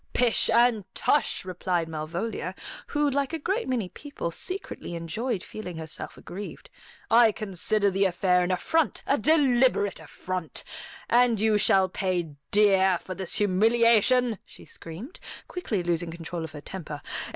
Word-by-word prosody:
"Pish 245 Hz, -2 st, +3 dB
and 230 Hz, -2 st, +4 dB
tush!" 290 Hz, -, +1 dB
replied 180 Hz, -2 st, -1 dB
Malvolia, 165 Hz, +8 st, -4 dB, 0.3 s
who, 295 Hz, 0 st, +1 dB
like 280 Hz, +2 st, 0 dB
a -, -, 0 dB
great 390 Hz, +10 st, -2 dB
many 245 Hz, -7 st, -1 dB
people, 280 Hz, -, -6 dB
secretly 365 Hz, -, -5 dB
enjoyed 190 Hz, +6 st, -3 dB
feeling 180 Hz, -6 st, -7 dB
herself 160 Hz, 0 st, -6 dB
aggrieved. 200 Hz, -, -9 dB, 0.4 s
"I 230 Hz, -1 st, +7 dB
consider 205 Hz, 0 st, 0 dB
the 195 Hz, +1 st, +2 dB
affair 180 Hz, 0 st, +2 dB
an 180 Hz, -, 0 dB
affront, 295 Hz, -, 0 dB
a 280 Hz, -, +2 dB
deliberate 255 Hz, -, +3 dB
affront. 170 Hz, +2 st, -5 dB, 0.4 s
And 240 Hz, -2 st, +4 dB
you 215 Hz, -1 st, +3 dB
shall 190 Hz, -2 st, +4 dB
pay 180 Hz, -3 st, -2 dB, 0.2 s
dear 195 Hz, -3 st, +4 dB
for 185 Hz, -, -7 dB
this 190 Hz, -1 st, -4 dB
humiliation," 230 Hz, +3 st, +3 dB
she -, -, -15 dB
screamed, 190 Hz, -, -10 dB, 0.3 s
quickly 220 Hz, -, -3 dB
losing 175 Hz, 0 st, -1 dB
control 165 Hz, 0 st, -5 dB
of 160 Hz, -, -7 dB
her 150 Hz, -, -8 dB
temper. 150 Hz, -4 st, -7 dB
200 Hz, 140 wpm, -26 LUFS, 175-240 Hz, 0.4 s, I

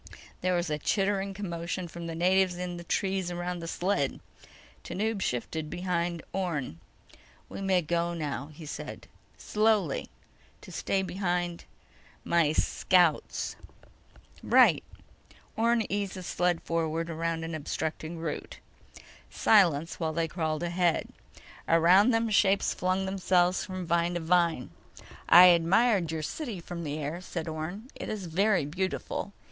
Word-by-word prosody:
There 185 Hz, 0 st, +1 dB
was 175 Hz, -2 st, -1 dB
a 150 Hz, -, -1 dB
chittering 195 Hz, +2 st, 0 dB
commotion 175 Hz, -2 st, -4 dB
from 170 Hz, 0 st, -8 dB
the 165 Hz, -, -5 dB
natives 185 Hz, +1 st, +2 dB
in 180 Hz, -1 st, -4 dB
the 170 Hz, -, -8 dB
trees 190 Hz, 0 st, -1 dB
around 175 Hz, 0 st, -3 dB
the 165 Hz, -, -6 dB
sled. 175 Hz, -5 st, -1 dB, 0.6 s
Tanub 215 Hz, 0 st, -2 dB
shifted 150 Hz, +5 st, -2 dB
behind 175 Hz, -1 st, -2 dB
Orne. 160 Hz, -, -3 dB, 0.7 s
"We -, -, -7 dB
may 190 Hz, -2 st, +2 dB
go 170 Hz, +2 st, -1 dB
now," 145 Hz, -3 st, -4 dB
he 155 Hz, +1 st, -11 dB
said. 150 Hz, -, -7 dB, 0.3 s
"Slowly... 210 Hz, -8 st, +1 dB, 0.5 s
to -, -, -12 dB
stay 195 Hz, -1 st, -1 dB
behind 175 Hz, -2 st, -2 dB, 0.6 s
my... 170 Hz, -3 st, +2 dB
scouts." 175 Hz, 0 st, +1 dB, 0.9 s
"Right." -, -, +5 dB, 0.7 s
Orne 230 Hz, 0 st, +2 dB
eased 200 Hz, -1 st, -2 dB
the 185 Hz, -, -7 dB
sled 175 Hz, -1 st, 0 dB
forward 165 Hz, 0 st, -1 dB
around 165 Hz, 0 st, -2 dB
an 165 Hz, 0 st, -5 dB
obstructing 160 Hz, +2 st, -4 dB
root. 160 Hz, -2 st, -5 dB, 0.7 s
Silence 170 Hz, -7 st, +3 dB
while 160 Hz, -2 st, -1 dB
they 165 Hz, 0 st, 0 dB
crawled 160 Hz, -1 st, -2 dB
ahead. 175 Hz, -1 st, +1 dB, 0.6 s
Around 175 Hz, +7 st, +5 dB
them 225 Hz, -2 st, +1 dB
shapes 200 Hz, -1 st, +3 dB
flung 185 Hz, +1 st, 0 dB
themselves 185 Hz, -1 st, +2 dB
from 185 Hz, -2 st, -5 dB
vine 170 Hz, +1 st, +1 dB
to -, -, 0 dB
vine. 165 Hz, -, +1 dB, 0.6 s
"I 175 Hz, +2 st, +10 dB
admired 180 Hz, +1 st, +3 dB
your 160 Hz, -1 st, -3 dB
city 235 Hz, -, -4 dB
from 170 Hz, 0 st, -7 dB
the 145 Hz, 0 st, -3 dB
air," 155 Hz, +4 st, -4 dB
said 170 Hz, -2 st, -5 dB
Orne. 175 Hz, -, -5 dB
"It -, -, -7 dB
is 210 Hz, -4 st, -4 dB
very 185 Hz, 0 st, +2 dB
beautiful." 185 Hz, +5 st, -3 dB
175 Hz, 135 wpm, -29 LUFS, 165-190 Hz, 0.9 s, I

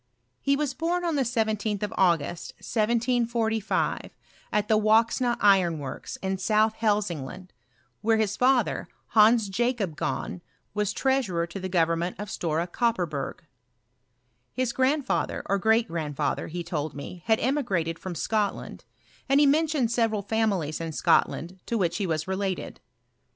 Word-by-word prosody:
He 280 Hz, -, +2 dB
was 285 Hz, -2 st, -1 dB
born 345 Hz, +4 st, -1 dB
on 335 Hz, -, 0 dB
the 285 Hz, -, +1 dB
17th 220 Hz, -4 st, -1 dB
of 210 Hz, -, -3 dB
August, 170 Hz, -3 st, +1 dB
1745, 230 Hz, -1 st, 0 dB
«t -, -, -12 dB, 0.6 s
the 220 Hz, -, +4 dB
Woxna 230 Hz, +3 st, +3 dB
iron 190 Hz, -5 st, +4 dB
works, 140 Hz, -3 st, -6 dB
in 190 Hz, 0 st, -1 dB
South 215 Hz, +2 st, +2 dB
Hdsingland, 185 Hz, -5 st, -1 dB, 0.5 s
where 225 Hz, +1 st, +3 dB
his 210 Hz, -2 st, 0 dB
father, 255 Hz, 0 st, +2 dB, 0.2 s
Hans 220 Hz, 0 st, +5 dB
Jacob 210 Hz, -4 st, -1 dB
Gahn, 175 Hz, -, -3 dB, 0.3 s
was 210 Hz, 0 st, 0 dB
treasurer 245 Hz, -12 st, 0 dB
to 185 Hz, +3 st, -8 dB
&e 185 Hz, -, -2 dB
government 170 Hz, 0 st, +1 dB
of 205 Hz, 0 st, -6 dB
Stora 165 Hz, 0 st, -1 dB
Kopperberg. 175 Hz, -, -1 dB, 1.1 s
His 255 Hz, -2 st, -1 dB
grandfa 265 Hz, +2 st, +1 dB
ther, -, -, -6 dB
or 200 Hz, 0 st, 0 dB
great 225 Hz, +3 st, +3 dB
grandfather, 155 Hz, -5 st, -2 dB
he 175 Hz, +2 st, -5 dB
told 155 Hz, -3 st, -3 dB
me, 145 Hz, +5 st, -8 dB
had 220 Hz, -1 st, +4 dB
emigrated 200 Hz, -, 0 dB
£rom 180 Hz, -1 st, -6 dB
Scotland; 210 Hz, +2 st, -2 dB, 0.4 s
and 275 Hz, +1 st, +5 dB
he 295 Hz, -, +6 dB
mentioned 290 Hz, -4 st, +2 dB
several 225 Hz, -3 st, +1 dB
families 195 Hz, -8 st, 0 dB
In 165 Hz, -1 st, -4 dB
Scotland 175 Hz, +4 st, +1 dB
to 235 Hz, -, 0 dB
which 175 Hz, -4 st, 0 dB
he 200 Hz, -3 st, -1 dB
was 155 Hz, -1 st, -1 dB
related. 190 Hz, -1 st, -3 dB
210 Hz, 145 wpm, -26 LUFS, 175-235 Hz, 1.1 s, he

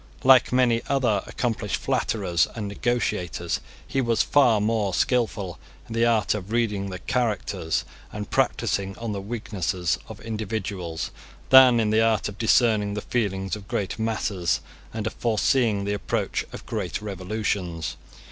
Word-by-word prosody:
Like 130 Hz, -1 st, +6 dB
many 125 Hz, -2 st, +3 dB
other 120 Hz, -8 st, +2 dB
accomplished 120 Hz, -4 st, -2 dB
flatterers 90 Hz, -6 st, 0 dB
and 110 Hz, -3 st, -4 dB
negotiators, 100 Hz, -6 st, -1 dB, 0.3 s
he 135 Hz, -, -1 dB
was 115 Hz, -2 st, +2 dB
far 125 Hz, -7 st, +4 dB
more 105 Hz, -2 st, 0 dB
skilful 110 Hz, -7 st, 0 dB, 0.3 s
in 115 Hz, -, -7 dB
the 115 Hz, +1 st, +3 dB
art 115 Hz, -2 st, +2 dB
of 105 Hz, -1 st, -6 dB
reading 105 Hz, -4 st, 0 dB
the 90 Hz, -, -5 dB
characters 110 Hz, -8 st, -1 dB, 0.3 s
and 105 Hz, -1 st, -5 dB
practising 95 Hz, -1 st, 0 dB
on 115 Hz, -1 st, -4 dB
the 100 Hz, -1 st, -3 dB
weaknesses 95 Hz, -5 st, -2 dB
of -, -, -9 dB
individuals, 105 Hz, -6 st, -4 dB, 0.4 s
than 130 Hz, -3 st, +9 dB
in 110 Hz, -2 st, +1 dB
the 110 Hz, +1 st, +4 dB
art 115 Hz, -1 st, +2 dB
of 100 Hz, -1 st, -8 dB
discerning 110 Hz, -3 st, +3 dB
the 105 Hz, -, -2 dB
feelings 95 Hz, -5 st, -1 dB
of 100 Hz, -1 st, -11 dB
great 100 Hz, +2 st, -2 dB
masses, 105 Hz, -5 st, 0 dB, 0.3 s
and 110 Hz, -2 st, -4 dB
of 110 Hz, -, -2 dB
foreseeing 115 Hz, -2 st, +1 dB
the 100 Hz, +1 st, -1 dB
approach 105 Hz, -, -2 dB
of -, -, -9 dB
great 100 Hz, -7 st, -3 dB
revolutions. 95 Hz, -5 st, -3 dB
105 Hz, 145 wpm, -25 LUFS, 95-115 Hz, 0.4 s, than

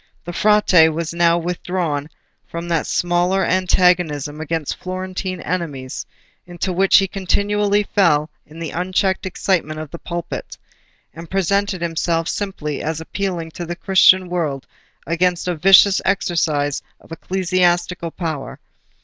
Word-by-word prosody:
The 175 Hz, -, -6 dB
Frate 205 Hz, -5 st, +5 dB
was 160 Hz, +1 st, -3 dB
now 170 Hz, 0 st, +3 dB
withdrawn 170 Hz, -3 st, -3 dB, 0.4 s
from 170 Hz, +1 st, -6 dB
that 165 Hz, -2 st, 0 dB
smaller 175 Hz, +2 st, +1 dB
antagonism 175 Hz, -5 st, +1 dB
against 160 Hz, -1 st, -3 dB
Florentine 185 Hz, 0 st, -5 dB
enemies 150 Hz, -7 st, -4 dB, 0.4 s
into 175 Hz, +1 st, -3 dB
which 190 Hz, +2 st, +5 dB
he 195 Hz, -, +3 dB
continually 205 Hz, +2 st, 0 dB
fell 160 Hz, -7 st, +2 dB, 0.2 s
in 155 Hz, -, -14 dB
the 165 Hz, -2 st, -5 dB
unchecked 185 Hz, +2 st, 0 dB
excitement 170 Hz, -5 st, -1 dB
of 155 Hz, -2 st, -7 dB
the 170 Hz, -, -8 dB
pulpit, 170 Hz, -1 st, -6 dB, 0.6 s
and 165 Hz, 0 st, -10 dB
presented 195 Hz, -1 st, 0 dB
himself 165 Hz, 0 st, -1 dB
simply 155 Hz, -8 st, -3 dB
as 160 Hz, 0 st, -3 dB
appealing 170 Hz, -1 st, -4 dB
to 175 Hz, -, -7 dB
the 175 Hz, -, -4 dB
Christian 185 Hz, 0 st, +4 dB
world 155 Hz, -7 st, -2 dB, 0.4 s
against 175 Hz, +1 st, 0 dB
a 180 Hz, -, +1 dB
vicious 195 Hz, +4 st, +6 dB
exercise 160 Hz, -7 st, 0 dB, 0.2 s
of -, -, -21 dB
ecclesiastical 180 Hz, -1 st, 0 dB
power. 160 Hz, -5 st, -5 dB
175 Hz, 130 wpm, -20 LUFS, 160-185 Hz, 0.6 s, vicious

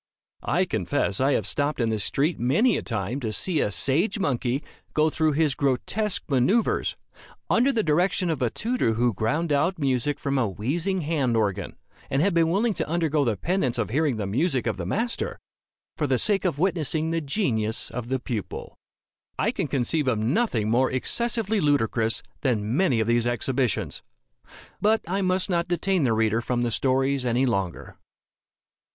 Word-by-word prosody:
I -, -, +1 dB
confess 100 Hz, -, -1 dB
I 135 Hz, +2 st, +3 dB
have -, -, 0 dB
stopped 145 Hz, -1 st, -1 dB
in 115 Hz, -2 st, +1 dB
the 110 Hz, -, -1 dB
street, 145 Hz, -, 0 dB
many 165 Hz, -, +3 dB
a -, -, -1 dB
time, 115 Hz, +3 st, -3 dB
to 115 Hz, -5 st, -3 dB
see 160 Hz, -, -1 dB
a -, -, +1 dB
sage 140 Hz, -, +1 dB
monkey 135 Hz, -, -1 dB, 0.3 s
go 155 Hz, +1 st, +3 dB
through 155 Hz, -1 st, +1 dB
his 150 Hz, -1 st, +2 dB
grotesque 145 Hz, -, -1 dB
manoeuvres, 155 Hz, -, +1 dB, 0.6 s
under 250 Hz, +4 st, +4 dB
the 230 Hz, -5 st, 0 dB
direction 175 Hz, +2 st, +1 dB
of 155 Hz, -, -3 dB
a 125 Hz, -, +2 dB
tutor 225 Hz, -, 0 dB
who 120 Hz, +1 st, +1 dB
ground 150 Hz, -, -1 dB
out 170 Hz, +6 st, +1 dB
music 140 Hz, 0 st, 0 dB
from 140 Hz, -1 st, 0 dB
a 120 Hz, -, +2 dB
wheezing 165 Hz, -, -1 dB
hand 145 Hz, -7 st, 0 dB
organ, 100 Hz, -3 st, -1 dB, 0.3 s
and 135 Hz, +3 st, +1 dB
have 200 Hz, 0 st, +2 dB
been 165 Hz, -1 st, +3 dB
willing 210 Hz, +6 st, +1 dB
to 160 Hz, -, -3 dB
undergo 160 Hz, -3 st, +1 dB
the 115 Hz, -6 st, 0 dB
penance 135 Hz, -, 0 dB
of 115 Hz, -2 st, -2 dB
hearing 145 Hz, -2 st, +1 dB
the 105 Hz, -, -2 dB
music 130 Hz, -, 0 dB
of 115 Hz, -, -1 dB
the -, -, -4 dB
master, 235 Hz, +3 st, -1 dB, 0.6 s
for 150 Hz, -, 0 dB
the 130 Hz, -2 st, +2 dB
sake 195 Hz, -, +1 dB
of 170 Hz, -6 st, 0 dB
witnessing 160 Hz, -2 st, 0 dB
the 165 Hz, 0 st, 0 dB
genius 120 Hz, -, -1 dB
of 120 Hz, -1 st, -5 dB
the 130 Hz, -, +1 dB
pupil. 120 Hz, -5 st, -5 dB, 0.6 s
I 215 Hz, -, +1 dB
can 195 Hz, -9 st, -2 dB
conceive 140 Hz, +2 st, 0 dB
of 120 Hz, -4 st, +2 dB
nothing 115 Hz, -, 0 dB
more 120 Hz, +4 st, +3 dB
excessively 220 Hz, -, -1 dB
ludicrous 115 Hz, -6 st, +1 dB, 0.2 s
than 115 Hz, -4 st, 0 dB
many 145 Hz, -9 st, +2 dB
of 110 Hz, -, -1 dB
these 120 Hz, 0 st, +2 dB
exhibitions. 120 Hz, 0 st, -1 dB, 0.8 s
But 220 Hz, +1 st, +3 dB
I 195 Hz, +3 st, -1 dB
must 185 Hz, 0 st, +1 dB
not 170 Hz, -3 st, 0 dB
detain 180 Hz, -2 st, +1 dB
the 115 Hz, -, +2 dB
reader 110 Hz, 0 st, +1 dB
from 120 Hz, 0 st, -1 dB
the 120 Hz, -, 0 dB
stories 135 Hz, +2 st, +1 dB
any 125 Hz, +2 st, +1 dB
longer. 100 Hz, -8 st, -3 dB
140 Hz, 180 wpm, -25 LUFS, 120-175 Hz, 0.8 s, under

